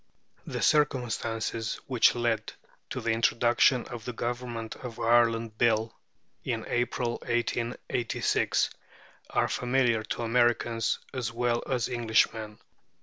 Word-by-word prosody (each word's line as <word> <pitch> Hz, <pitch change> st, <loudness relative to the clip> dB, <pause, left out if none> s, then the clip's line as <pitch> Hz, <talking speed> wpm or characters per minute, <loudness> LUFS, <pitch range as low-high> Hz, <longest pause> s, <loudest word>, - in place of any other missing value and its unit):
The -, -, -3 dB
circumstances 115 Hz, -6 st, 0 dB
which 125 Hz, -5 st, +4 dB
led 120 Hz, -2 st, -1 dB, 0.4 s
to -, -, -4 dB
the 115 Hz, -, 0 dB
introduction 120 Hz, +2 st, +3 dB
of 120 Hz, -2 st, -8 dB
the 125 Hz, -, -5 dB
Government 120 Hz, -1 st, -4 dB
of 120 Hz, -3 st, -8 dB
Ireland 115 Hz, -1 st, +2 dB
Bill, 115 Hz, -1 st, +2 dB, 0.5 s
in -, -, -2 dB
April, 120 Hz, 0 st, -1 dB
1886, 120 Hz, 0 st, 0 dB, 0.6 s
are -, -, +1 dB
familiar 125 Hz, -2 st, +1 dB
to 120 Hz, -, -3 dB
Americans 120 Hz, -1 st, +2 dB, 0.2 s
as 125 Hz, -3 st, -2 dB
well 120 Hz, 0 st, 0 dB
as 125 Hz, -3 st, 0 dB
Englishmen. 110 Hz, -3 st, +1 dB
120 Hz, 110 wpm, -28 LUFS, 115-120 Hz, 0.6 s, which